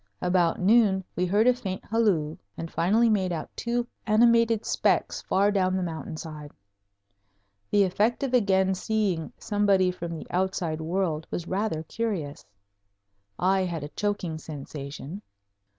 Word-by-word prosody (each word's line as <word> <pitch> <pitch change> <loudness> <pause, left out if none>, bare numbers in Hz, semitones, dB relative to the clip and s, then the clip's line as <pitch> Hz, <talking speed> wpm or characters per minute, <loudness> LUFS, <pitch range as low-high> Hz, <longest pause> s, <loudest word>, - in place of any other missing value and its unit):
About 180 -2 +2
noon 200 -1 +4
we 180 +1 0
heard 205 +5 +3
a 250 - +6
faint 190 -6 -5
halloo, 195 -9 +1 0.2
and 165 - -6
finally 215 +7 +3
made 195 -5 +1
out 160 -3 -5
two 240 0 -1 0.2
animated 230 0 +4
specks - - +1
far 200 +2 +2
down 185 -2 +1
the 185 - -1
mountain 160 -2 -5
side. 155 -2 -8 1.2
The 205 - +4
effect 210 +7 +1
of 265 -2 -2
again 190 -5 +3
seeing 190 -4 -1
somebody 200 -3 +2
from 170 -2 -6
the - - -8
outside 180 -3 -1
world 165 -2 -1
was 175 - -4
rather 190 -5 -1
curious. 180 -7 -4 0.9
I 190 +1 +2
had 170 -4 -4
a 145 - -6
choking 195 -5 -2
sensation. 145 +3 -7
190 Hz, 140 wpm, -26 LUFS, 165-210 Hz, 1.2 s, a